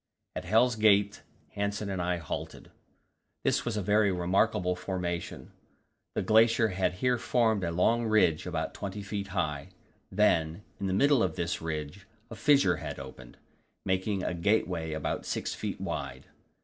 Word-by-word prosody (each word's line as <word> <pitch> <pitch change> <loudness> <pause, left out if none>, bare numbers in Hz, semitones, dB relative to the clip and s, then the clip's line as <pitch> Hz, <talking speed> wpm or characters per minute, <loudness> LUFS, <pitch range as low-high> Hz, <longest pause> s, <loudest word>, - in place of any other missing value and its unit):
At - - -5
Hell's 115 +5 +3
Gate 105 -2 +3 0.3
Hanssen 100 0 -2
and 95 -2 -2
I 90 0 0
halted. 80 - -7 0.7
This - - +1
was 115 -3 -2
a 105 - -1
very 105 +1 +3
remarkable 90 +1 +1
formation; 90 -2 -4 0.6
the - - 0
glacier 110 +1 +4
had 95 -1 0
here 125 +6 0
formed 110 -5 +1
a 85 - 0
long 115 +7 +2
ridge 90 -7 +2
about 80 -3 -3
20 100 0 -6
feet 100 0 -4
high; 75 -7 -2 0.4
then, 85 -3 +2 0.2
in 100 - -2
the 95 - -1
middle 140 +5 +4
of 90 -6 0
this 85 +1 -2
ridge, 80 +4 -5 0.2
a - - -6
fissure 135 - +3
had - - -6
opened, 65 -2 -11 0.5
making 95 +1 0
a - - -1
gateway 85 -3 0
about 80 -1 -3
6 - - -2
feet - - -5
wide. - - -5
95 Hz, 155 wpm, -29 LUFS, 85-105 Hz, 0.7 s, glacier